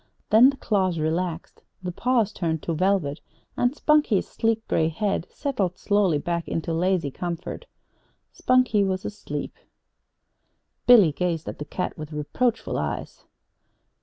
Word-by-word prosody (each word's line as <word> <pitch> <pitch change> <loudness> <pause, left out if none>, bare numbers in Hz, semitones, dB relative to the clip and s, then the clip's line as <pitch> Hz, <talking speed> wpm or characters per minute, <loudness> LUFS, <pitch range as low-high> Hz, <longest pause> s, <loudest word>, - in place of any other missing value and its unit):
Then 230 +5 +8
the 275 - -4
jaws 190 -7 0
relaxed, 165 +2 -2 0.2
the 180 - -3
paws 230 +1 +1
turned 160 -3 -2
to 165 - -2
velvet, 170 -4 0 0.3
and 245 - +2
Spunkie's 300 -11 +2
sleek 225 0 -1
gray 160 - +2
head 180 +2 -1
settled 205 - -2
slowly 200 -6 +2
back 170 +3 -3
into 165 0 -2
lazy 170 -3 +1
comfort. 175 - -5 0.7
Spunkie 255 -5 +3
was 190 -1 -2
asleep. 210 - -5 1.3
Billy 220 -10 +8
gazed 165 0 -2
at - - -6
the 150 - -5
cat 180 +5 -4
with 155 0 -7
reproachful 225 +11 -1
eyes. - - -5
185 Hz, 135 wpm, -25 LUFS, 165-220 Hz, 1.3 s, Then